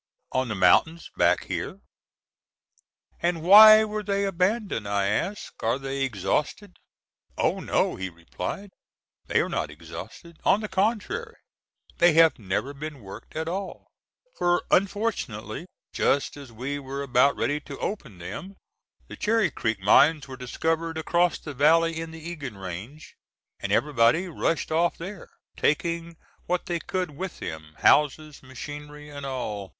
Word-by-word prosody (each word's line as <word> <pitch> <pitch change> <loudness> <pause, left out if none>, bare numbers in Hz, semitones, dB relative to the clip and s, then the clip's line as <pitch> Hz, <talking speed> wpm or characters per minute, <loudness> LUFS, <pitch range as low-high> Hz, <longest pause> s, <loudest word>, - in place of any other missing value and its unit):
"On 130 0 0
the 110 - -3
mountains 160 - +3
back - - +3
here." - - -4 1.4
"And 170 -2 0
why 215 +4 +10
were 215 0 -3
they 200 -1 0
abandoned?" 195 - 0
I 100 -1 +1
asked. 190 - -2
"Are 115 +3 +1
they 135 0 -4
exhausted?" 135 - -2 0.6
"Oh, - - +1
no," - - 0
he 95 0 -4
replied, 90 - -6 0.6
"they - - +3
are - - -1
not - - -2
exhausted; 170 -2 -10
on 205 - +3
the 215 - -3
contrary, 230 - -1 0.6
they 175 -1 +6
have 165 -3 +5
never 105 +7 -2
been 145 -1 -7
worked 100 -1 -11
at 160 +1 -3
all, 190 +3 -5 0.5
for 175 0 +2
unfortunately, 185 - -1 0.3
just 140 - +1
as 140 -4 -11
we 130 +6 -4
were 140 0 -5
about 130 +1 +3
ready 145 +2 0
to 140 -1 -9
open 135 - -5
them, 180 - -7 0.5
the - - -9
Cherry 215 -5 +1
Creek 110 -5 -2
mines 145 +9 +5
were 130 - -8
discovered 160 +6 -2
across 170 +2 +1
the 150 - -8
valley 165 +4 +3
in 165 - -6
the 160 0 -9
Egan 140 - -6
range, 95 - -8 0.5
and - - -4
everybody 145 +5 +3
rushed 165 -1 -1
off 170 +2 +2
there, 190 +3 -8 0.3
taking 170 +2 -1 0.3
what 180 0 -1
they 175 -1 -2
could 185 -1 -3
with 180 +6 -6
them—houses 140 - +1
machinery, 150 +3 -9
and 140 -1 -7
all. 105 -7 -4
155 Hz, 145 wpm, -26 LUFS, 130-175 Hz, 1.4 s, why